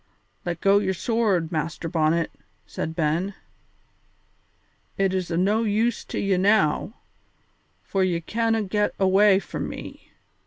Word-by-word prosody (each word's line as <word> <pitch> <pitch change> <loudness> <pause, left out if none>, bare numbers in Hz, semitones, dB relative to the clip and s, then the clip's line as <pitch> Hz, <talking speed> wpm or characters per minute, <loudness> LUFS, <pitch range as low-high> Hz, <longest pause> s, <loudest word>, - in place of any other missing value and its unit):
"Let 175 -1 -3
go 200 +1 +5
your 190 -2 -1
sword, 200 -6 0
Master 165 +1 -3
Bonnet," 165 0 +1 0.3
said 160 - -5
Ben; 170 +5 0 1.6
"it 195 -1 +1
is 185 -2 -2
o' 165 - -1
no 200 +6 +2
use 220 +2 0
to - - -6
ye 195 -2 +1
now, 200 +1 +2 0.9
for 195 -1 0
ye 175 -2 +1
canna 225 +5 0
get 205 +1 -1
awa' 195 +1 +5
from - - -5
me. - - -9
190 Hz, 130 wpm, -24 LUFS, 170-210 Hz, 1.6 s, go